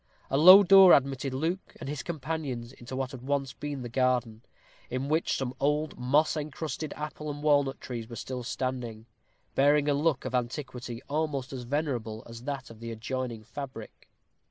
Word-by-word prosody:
A 135 - +2
low 185 +5 +10
door 195 -1 +9
admitted 135 0 +2
Luke 165 +8 -3
and - - -7
his 145 -2 -3
companions 140 -6 -4
into 125 0 -9
what 130 -1 -2
had 130 - -9
once 135 -1 -1
been 145 -2 -5
the - - -4
garden, 125 -3 0 0.5
in 130 +3 -3
which 160 +2 +1
some 130 -2 -3
old 150 +2 0
moss 140 +7 +3
encrusted 155 0 -4
apple 150 0 -5
and 145 0 -6
walnut 145 -3 +3
trees 115 -3 -6
were 115 - -7
still 125 +1 -5
standing, 120 -3 -4 0.5
bearing 145 +1 +4
a 145 - +3
look 145 -1 +1
of 130 - -4
antiquity 125 -1 -3
almost 145 -2 -2
as 125 -2 -6
venerable 120 -6 -2
as 115 +1 -10
that 140 -4 -4
of 110 - -13
the 115 0 -6
adjoining 115 0 -4
fabric. 130 -1 -9
135 Hz, 175 wpm, -29 LUFS, 125-150 Hz, 0.5 s, low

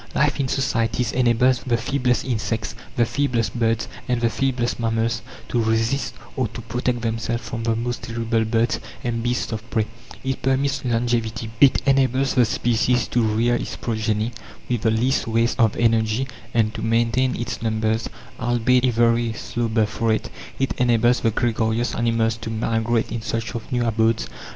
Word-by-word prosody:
Life 150 +1 +2
in 135 - +1
societies 120 -2 0
enables 125 0 +3
the 120 -3 0
feeblest 125 0 0
insects, 115 -3 -2 0.2
the 120 - +3
feeblest 120 -5 0
birds, 115 -2 0 0.2
and 125 -2 +1
the 115 -1 +1
feeblest 125 -3 -1
mammals 115 0 0 0.3
to 120 - +1
resist, 115 +5 0 0.2
or 130 -3 0
to 115 +2 -8
protect 120 +2 -2
themselves 115 +1 -2
from, 115 +1 -4
the 115 -1 +2
most 120 +1 -3
terrible 115 -1 -1
birds 115 +1 +1 0.2
and 115 -1 -1
beasts 120 +1 -1
of 110 +1 -5
prey; 110 -2 +1 0.4
it 135 0 -2
permits 135 +1 +1
longevity; 115 -2 -1
it 140 -2 +6
enables 135 -1 +3
the 125 -2 +4
species 120 +2 +1
to 120 - +2
rear 115 +2 +2
its 120 - -2
progeny 110 0 -1 0.4
with 120 -3 -1
the 110 - +2
least 115 +4 +1
waste 115 +2 +1
of 115 -3 +3
energy 115 +2 +2 0.2
and 110 -2 +1
to - - -5
maintain 115 +3 +1
its 120 - -4
numbers 110 0 0 0.3
albeit 120 +1 +2
a - - +4
very 115 0 +2
slow 120 +1 -3
birth 110 -1 0
rate; 115 0 +1 0.3
it 135 - 0
enables 120 0 +3
the 115 - +2
gregarious 115 +1 0
animals 115 -1 +1
to 110 - -6
migrate 115 +1 0
in 115 - -3
search 115 +1 -3
of 115 -2 -6
new 120 -1 +1
abodes. 110 0 +1
115 Hz, 170 wpm, -22 LUFS, 115-125 Hz, 0.4 s, it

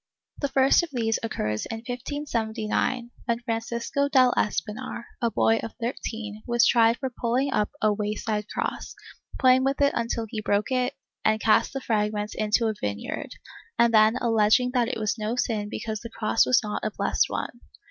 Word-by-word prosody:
The 285 - 0
first 270 +3 +4
of 345 - -5
these 225 -4 0
occurs 105 - -2
in 225 0 -6
1579, 240 -2 -2
when 235 -1 0
Francisco 235 +4 -2
del 255 -3 +5
Espinar, 210 +3 -2 0.2
a 235 - +2
boy 225 0 +2
of 225 - -5
13, 225 -3 -5
was 240 -1 +4
tried 230 0 +4
for 265 -1 -4
pulling 250 +3 0
up 210 - +1
a 215 -1 +4
way 210 0 -2
side 210 -1 -3
cross, - - -4 0.4
playing 255 -1 +5
with 275 +1 0
it 280 0 +3
until 230 -1 -1
he 215 0 -5
broke 205 +2 0
it 250 -1 0 0.3
and 215 0 +2
cast 220 +4 +3
the 270 - -3
fragments 210 -2 -1
into 215 +2 +1
a 220 - 0
vineyard, 100 0 -4 0.4
and 235 0 +4
then 215 +1 +6
alleging 225 +2 +3
that 245 -3 +2
it 255 - -3
was 215 +1 -1
no 215 +2 -2
sin 215 -4 -1
because 220 0 -4
the 230 - -8
cross 225 0 +1
was 255 - +4
not 210 -1 -4
a 215 - 0
blessed - - 0
one. 240 - -4
230 Hz, 180 wpm, -26 LUFS, 215-250 Hz, 0.4 s, then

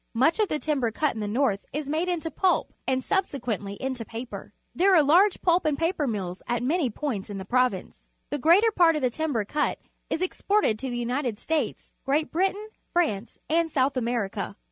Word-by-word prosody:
Much 315 - +3
of 425 - +3
the 305 - -1
timber 290 -6 0
cut 295 +6 0
in 225 - -6
the 210 - -2
north 215 -2 +1
is 295 0 -4
made 320 +5 0
into 330 -2 -2
pulp 375 -2 +1
and 260 0 +1
subse 380 -7 0
quently 205 -4 -3
into 260 -3 -3
paper. 230 +2 -8 0.2
There 380 +2 +4
are 315 - +6
large 360 +8 +4
pulp 350 0 +3
andjjaper 310 -1 0
mills 185 -4 -4
at 240 0 -1
many 295 +1 +1
points 225 -5 -4
in 205 - -5
the 190 - -6
prov 250 0 +3
ince. 185 - -12 0.2
The 290 - -1
greater 360 - +5
part 340 -5 +4
of 300 - -2
the 250 - +2
timber 280 -6 -1
cut 295 +7 0 0.3
is 340 - -1
exported 370 - +1
to 265 - -4
the 240 - -3
United 240 -1 -1
States, 320 +7 -2
Great 295 +4 0
Britain, 390 +5 0 0.3
Vmnof^ 235 - 0
nnH 335 +2 +2
S"utb 275 -3 +1
Ame 245 - 0
rica. 195 -1 -4
285 Hz, 205 wpm, -26 LUFS, 235-335 Hz, 0.3 s, are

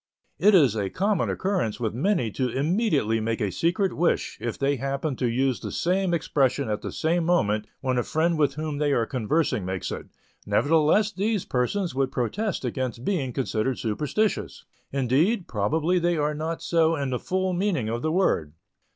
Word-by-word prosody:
It 210 0 +6
is 135 - +5
a 100 -3 -1
common 200 - 0
occurrence 185 - -1
with 110 -3 -1
many 130 - 0
to 130 +4 -1
immediately 145 - +1
make 115 +1 -2
a 105 -4 -1
secret 175 - 0
"wish" 170 +2 0
if 120 -1 -3
they 140 0 +1
happen 135 +2 -2
to 125 - 0
use 130 +2 +1
the - - -6
same 185 +1 0
expression 140 -4 +1
at 105 0 -2
the - - -5
same 170 +2 0
moment 110 -12 +1
when 130 -2 0
a - - 0
friend 165 +2 +1
with 140 -2 +2
whom 155 -1 -3
they 145 -1 +2
are 115 -3 +2
conversing 125 - 0
makes 95 -1 -3
it; - - -6 0.4
nevertheless 165 +8 +3
these 210 0 -1
persons 165 +9 -1
would 135 0 0
protest 165 - -2
against 125 0 -3
being 150 -11 0
considered 125 0 -1
superstitious, 150 - -1 0.3
indeed, 140 - +1
probably 155 - +1
they 175 0 +1
are 150 0 0
not 160 +2 -4
so 165 -1 +2
in 140 -3 -2
the 125 - -1
full 185 0 -1
meaning 175 - 0
of 115 +2 -2
the 155 - 0
word. 85 - +1
145 Hz, 180 wpm, -25 LUFS, 125-175 Hz, 0.4 s, It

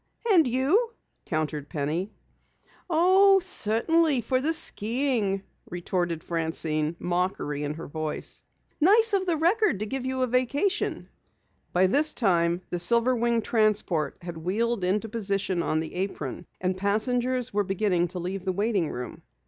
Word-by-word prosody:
"And 330 -8 +5
you?" 305 - +1 0.3
countered 155 -2 -3
Penny. 160 +7 -2 0.8
"Oh, 375 +4 +5
certainly 325 - +2
for 255 +3 0
the 310 +4 +1
skiing," 225 -7 0 0.3
retorted 175 -2 -2
Francine, 160 -1 0
mockery 175 -5 -2
in 150 0 -3
her 165 - -8
voice. 155 +1 -3 0.4
"Nice 425 +7 +4
of 380 -1 +1
the 335 -2 +1
Record 360 - +2
to - - -1
give 265 +4 -3
you 260 0 -1
a - - +4
vacation." 275 - 0 0.6
By 180 +1 +3
this 295 +10 +2
time 175 -5 +1
the 175 - -2
silver 235 +7 +3
winged 235 -1 0
transport 205 - +1
had 170 -1 -7
wheeled 205 +6 -1
into 205 +5 0
position 200 -4 -1
on 155 -1 0
the 160 - -7
apron, 180 -4 -4
and 185 0 -1
passengers 240 +5 0
were 205 0 +1
beginning 190 -2 0
to 180 +2 -6
leave 180 +2 -4
the 190 - -1
waiting 200 -3 0
room. 125 0 -7
205 Hz, 145 wpm, -26 LUFS, 175-260 Hz, 0.8 s, And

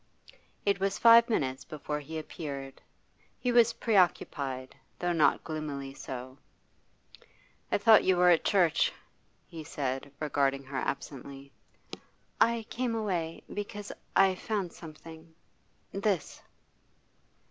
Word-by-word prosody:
It 200 -1 +2
was 195 +1 0
five 230 0 +7
minutes 130 - -1
before 150 -1 -5
he 155 +2 -7
appeared. 140 -3 -7 0.6
He 250 - -1
was 235 -1 +5
preoccupied, 140 - 0 0.2
though 175 0 -1
not 165 -3 +3
gloomily 145 -4 -5
so. 130 0 -8 1.3
'I - - +3
thought 220 +1 +6
you 185 -1 +3
were 180 0 +6
at 165 - +3
church,' 180 -5 +3 0.5
he 165 -2 -9
said, 140 -3 -4
regarding 140 -2 0
her 135 0 -6
absently. 140 0 -5 0.9
'I 230 -1 +3
came 245 -2 -1
away 175 -7 -2
because 205 0 -5 0.2
I 195 -1 +5
found 195 -2 -3
something 160 0 -12 0.6
this! 195 -4 -1
160 Hz, 115 wpm, -30 LUFS, 140-200 Hz, 1.3 s, five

